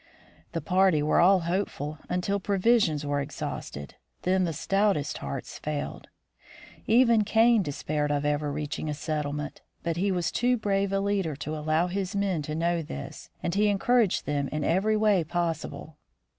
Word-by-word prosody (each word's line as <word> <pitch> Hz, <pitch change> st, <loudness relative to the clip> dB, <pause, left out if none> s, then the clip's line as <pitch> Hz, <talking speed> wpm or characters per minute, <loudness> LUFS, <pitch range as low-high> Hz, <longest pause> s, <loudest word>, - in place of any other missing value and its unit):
The 165 Hz, -, -2 dB
party 180 Hz, -1 st, +3 dB
were 150 Hz, -, +3 dB
all 185 Hz, +2 st, +5 dB
hopeful 165 Hz, -4 st, -2 dB
until 180 Hz, +3 st, 0 dB
provisions 200 Hz, -6 st, +2 dB
were 145 Hz, 0 st, 0 dB
ex 140 Hz, -, -6 dB
hausted; 70 Hz, 0 st, -5 dB, 0.3 s
then 185 Hz, 0 st, +2 dB
the 170 Hz, -, -1 dB
stoutest 195 Hz, -1 st, 0 dB
hearts 70 Hz, -, -6 dB
failed. 150 Hz, -1 st, -4 dB, 0.8 s
Even 230 Hz, -1 st, +5 dB
Kane 225 Hz, +1 st, +4 dB
de 150 Hz, -, -3 dB
spaired 150 Hz, +1 st, -2 dB
of 145 Hz, 0 st, 0 dB
ever 145 Hz, 0 st, 0 dB
reaching 150 Hz, +1 st, -4 dB
a 150 Hz, -, -2 dB
settlement, 150 Hz, -1 st, -3 dB, 0.2 s
but 170 Hz, -1 st, -1 dB
he 195 Hz, +3 st, +1 dB
was 175 Hz, -2 st, 0 dB
too 245 Hz, +1 st, +2 dB
brave 200 Hz, -2 st, 0 dB
a 195 Hz, -, +1 dB
leader 195 Hz, -6 st, 0 dB
to 155 Hz, +2 st, -5 dB
allow 155 Hz, +2 st, +1 dB
his 190 Hz, +2 st, -3 dB
men 195 Hz, -5 st, 0 dB
to 150 Hz, +1 st, -4 dB
know 170 Hz, +1 st, +1 dB
this, 70 Hz, -, -8 dB
and 170 Hz, -, -1 dB
he 210 Hz, +2 st, +3 dB
encouraged 210 Hz, +1 st, +2 dB
them 140 Hz, -1 st, -1 dB
in 150 Hz, +1 st, -3 dB
every 200 Hz, +7 st, +2 dB
way 210 Hz, -5 st, +3 dB
possible. 160 Hz, -2 st, -3 dB
170 Hz, 170 wpm, -27 LUFS, 150-200 Hz, 0.8 s, all